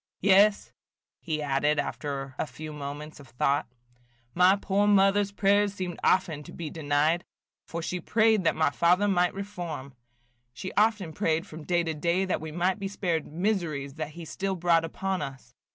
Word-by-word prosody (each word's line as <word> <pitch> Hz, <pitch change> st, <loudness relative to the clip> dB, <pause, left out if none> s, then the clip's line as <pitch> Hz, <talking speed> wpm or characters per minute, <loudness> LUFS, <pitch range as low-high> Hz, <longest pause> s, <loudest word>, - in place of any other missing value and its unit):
Yes," 200 Hz, +2 st, +4 dB, 0.5 s
he 155 Hz, -2 st, -3 dB
added, 145 Hz, +1 st, +1 dB
after 140 Hz, -2 st, -3 dB
a -, -, -1 dB
few 155 Hz, +4 st, -8 dB
moments 150 Hz, +1 st, -7 dB
of 140 Hz, -, -13 dB
thought, 140 Hz, +3 st, 0 dB, 0.7 s
"my 180 Hz, +4 st, +5 dB
poor 200 Hz, +1 st, +1 dB
mother's 200 Hz, 0 st, +4 dB
prayers 200 Hz, 0 st, +2 dB
seemed 180 Hz, -3 st, -4 dB
often 170 Hz, -5 st, +2 dB
to -, -, -12 dB
be 160 Hz, -3 st, -6 dB
denied, 155 Hz, +2 st, +1 dB, 0.4 s
for 170 Hz, 0 st, -5 dB
she 180 Hz, +2 st, -3 dB
prayed 220 Hz, +1 st, +3 dB
that 165 Hz, -, +2 dB
my 155 Hz, -2 st, +2 dB
father 180 Hz, +6 st, +3 dB
might 180 Hz, -2 st, +2 dB
reform. 175 Hz, -9 st, -6 dB, 0.6 s
She 185 Hz, +9 st, -6 dB
often 210 Hz, -6 st, +2 dB
prayed 165 Hz, -2 st, 0 dB
from 155 Hz, -1 st, -10 dB
day 175 Hz, -1 st, +1 dB
to 165 Hz, -1 st, -2 dB
day 170 Hz, +5 st, 0 dB
that 185 Hz, -, -1 dB
we 160 Hz, 0 st, -6 dB
might 180 Hz, +5 st, 0 dB
be 195 Hz, -, -3 dB
spared 175 Hz, -5 st, -2 dB
miseries 160 Hz, -6 st, -2 dB
that 155 Hz, 0 st, -5 dB
he 170 Hz, 0 st, -8 dB
still 195 Hz, +4 st, -3 dB
brought 170 Hz, -2 st, +3 dB
upon 190 Hz, +3 st, -3 dB
us. 130 Hz, -2 st, -8 dB
170 Hz, 170 wpm, -27 LUFS, 150-195 Hz, 0.7 s, my